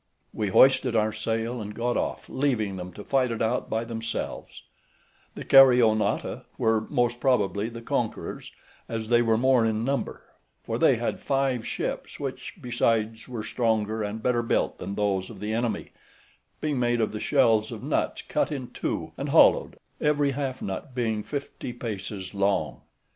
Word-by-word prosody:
We 105 - -1
hoisted 130 +4 +5
our 110 -1 +2
sail, 115 +2 -2
and 105 0 -7
got 120 +1 -1
off, - - -2
leaving 120 -8 0
them 90 0 -6
to 105 - -9
fight 130 0 +1
it 115 -1 -3
out 115 +3 0
by 110 +1 -1
themselves; 115 -1 -5 0.7
the - - -6
Caryonautae 125 -5 +5 0.2
were 110 -1 +2
most 120 -3 +1
probably 110 -5 +1
the 115 0 -9
conquerors, - - -3 0.4
as 110 -1 -4
they 120 0 +5
were 115 -2 +3
more 130 0 +4
in 110 0 0
number, 140 +1 -2 0.4
for - - -3
they - - +5
had - - -2
five 135 -4 0
ships, - - -4
which - - -5
besides 115 -2 0
were 120 -4 -5
stronger 110 -2 0
and 105 +1 -4
better 125 -2 +2
built 115 - 0
than 100 +2 -5
those 100 -2 0
of - - -10
the 105 +1 -3
enemy, 115 0 -2 0.7
being 150 -4 -1
made 120 -1 +1
of 110 - +1
the 105 - -5
shells 115 -6 +3
of - - -7
nuts - - -1
cut - - -1
in 130 -4 -4
two, - - -3
and - - -3
hollowed, - - +5 0.2
every 145 -1 +2
half 135 -1 -3
nut 100 +8 -5
being 110 -4 0
fifty 140 0 -5
paces 100 -5 -6
long. 100 0 0
115 Hz, 165 wpm, -26 LUFS, 110-125 Hz, 0.7 s, hoisted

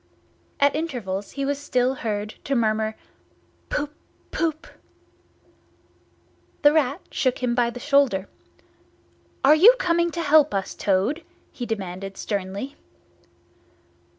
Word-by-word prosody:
At 285 0 +4
intervals 230 - -4
he 275 -1 -2
was 280 0 -1
still 255 -3 +1
heard 210 -5 -3 0.2
to 275 - 0
murmur 220 -2 +1 0.7
"Poop 295 0 -2 0.4
poop!" 320 -1 -1 2.0
The 290 0 +7
Rat 285 -3 +1
shook 255 -1 0
him 245 -1 +1
by 240 -1 +2
the 245 - -8
shoulder. 275 -8 +2 1.2
"Are 280 +3 +7
you 400 +11 +8
coming 340 -3 +1
to 335 0 -3
help 300 -5 +4
us, 195 -1 -2
Toad?" 205 - 0 0.3
he 245 - -6
demanded 195 -2 -5
sternly. 200 +7 -4
255 Hz, 115 wpm, -24 LUFS, 210-295 Hz, 2.0 s, you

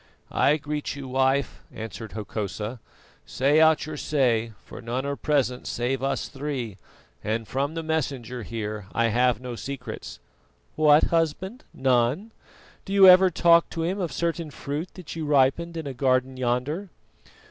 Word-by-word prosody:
"I 150 +2 +3
greet 150 0 -4
you, 140 -2 -7
Wife," 135 +1 +1
answered 110 -1 -7
Hokosa. 105 +2 -4 0.5
"Say 145 +4 +3
out 160 -1 +4
your 155 -1 -6
say, 120 -7 +1
for - - -10
none 125 +3 -3
are 140 0 -2
present 135 -5 0
save 125 +2 -1
us 135 0 -1
three, 130 -8 -5 0.4
and 110 +1 -2
from 140 +4 -2
the 165 - -3
Messenger 135 -6 -2
here 105 -2 -5
I 115 0 +2
have 120 0 +2
no 125 -1 -6
secrets." 125 -2 -7 0.6
"What, 150 0 +5
Husband, 170 - -1
none? 130 - +1 0.5
Do 195 - -6
you 195 -1 +8
ever 185 +1 +8
talk 170 -1 +4
to 165 - -3
him 185 +4 -1
of 175 -4 -2
certain 170 -1 -2
fruit 145 +4 -5
that 180 -4 -8
you 160 -2 -4
ripened 145 +4 +2
in 160 - -4
a 140 - -4
garden 130 0 +1
yonder?" 130 +10 -1
135 Hz, 155 wpm, -25 LUFS, 120-160 Hz, 0.6 s, you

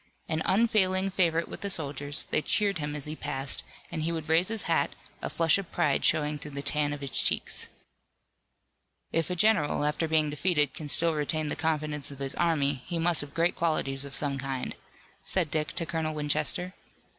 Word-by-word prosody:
An 160 -1 -1
unfailing 195 -3 +2
favorite 170 -3 +1
with - - -8
the 200 - -2
soldiers, 145 -3 0
they - - +2
cheered 200 +1 +1
him 145 0 -3
as 145 - 0
he 150 +1 -4
passed, 135 -3 0 0.3
and 165 -2 -3
he 165 +2 0
would 160 -2 -4
raise 165 +3 +4
his 225 -1 -1
hat, - - +1 0.3
a - - -3
flush 165 +2 +3
of 195 - -8
pride 140 -2 +1
showing 150 -1 +2
through 150 - -7
the 140 - -3
tan 145 +1 +1
of 145 -1 -5
his 140 -1 -5
cheeks. - - 0 1.4
"If 165 0 0
a 180 - -1
general, 170 -7 +3
after 150 +2 0
being 155 -1 +2
defeated, 150 -2 +1
can 150 -2 -6
still 165 +3 +4
retain 155 0 0
the - - 0
confidence 150 -3 -1
of 140 - -9
his 135 0 -4
army 145 -6 +1
he 175 - -2
must 170 0 +3
have 145 -1 -9
great 170 +1 +2
qualities 140 -5 0
of 140 -1 -5
some 140 -2 -1
kind," 135 -1 -3 0.5
said 170 -6 -1
Dick 155 -1 -1
to 170 -1 -2
Colonel 160 -1 -2
Winchester. 150 +4 0
155 Hz, 195 wpm, -29 LUFS, 145-170 Hz, 1.4 s, raise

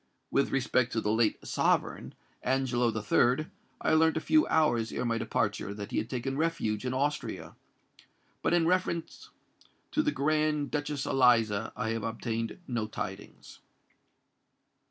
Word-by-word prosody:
With 140 - +2
respect 125 -2 +1
to 110 - 0
the 105 - 0
late 110 0 +1
sovereign, - - 0 0.3
Angelo 130 -2 +1
III., 120 +6 +2 0.4
I - - +2
learnt 160 0 +4
a - - +2
few 310 - +3
hours 120 -8 +2
ere - - -2
my 115 -1 0
departure, 100 - -1
that 100 -1 -7
he - - +1
had 110 - -4
taken 135 +1 -3
refuge 140 -10 -1
in 125 - -1
Austria; 145 +3 -2 0.9
but - - +1
in 170 -1 +3
reference 175 -1 -1 0.6
to 305 - +2
the 300 - +1
Grand 155 - 0
Duchess 145 -1 -2
Eliza 115 -5 +3
I 110 - -2
have 115 0 -2
obtained 115 +1 -3
no 120 -4 -2
tidings." 95 -2 -7
125 Hz, 145 wpm, -29 LUFS, 115-155 Hz, 0.9 s, learnt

